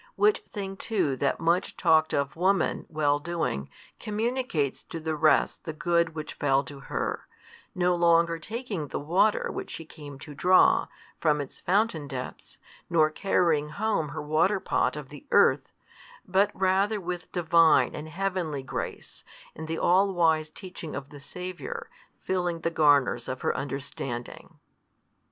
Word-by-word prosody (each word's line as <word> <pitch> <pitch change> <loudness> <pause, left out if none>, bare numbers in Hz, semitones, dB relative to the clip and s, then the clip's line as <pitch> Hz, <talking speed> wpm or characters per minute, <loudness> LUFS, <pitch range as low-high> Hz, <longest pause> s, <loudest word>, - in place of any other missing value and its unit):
Which 420 0 +3
thing 195 -2 -5
too 185 - 0
that 140 +1 0
much 170 +3 +1
talked 160 -3 +4
of 140 -1 -1
woman 190 +4 +1
well 145 -2 +1
doing, 155 - -3 0.3
communicates 220 - -1
to 165 - -6
the 160 0 -2
rest 155 0 +2
the 160 - -5
good 170 +1 +1
which 155 -1 -5
fell 135 -1 +2
to 140 +1 -10
her, - - -4 0.5
no 180 0 +2
longer 170 -1 +3
taking 215 - -5
the - - -4
water 180 +8 +2
which - - -6
she 165 - -7
came 145 -3 -11
to 150 +2 -10
draw, 180 +6 +4 0.3
from 150 -2 +2
its 140 - -7
fountain 190 -7 +1
depths, 130 -2 -7 0.3
nor 155 -2 +3
carrying 160 -4 +1
home 200 -4 -1
her 150 +1 -5
waterpot 165 +6 +1
of 150 -3 -7
the 145 -1 -12
earth, - - +4 0.6
but 195 +2 +3
rather 195 +3 +2
with 180 -1 -5
Divine 165 -1 +4
and 155 +1 -7
heavenly 170 -5 -2
grace 130 - -6 0.3
and 160 - -7
the 165 0 -3
all 190 +3 +3
wise 160 -2 +2
teaching 180 -2 -8
of 140 0 -6
the 145 - -11
Saviour 185 - -7 0.3
filling 175 -3 -1
the 165 - -1
garners 145 -6 +3
of 130 - -4
her - - 0
understanding. 135 -3 -5
165 Hz, 150 wpm, -27 LUFS, 150-185 Hz, 0.6 s, talked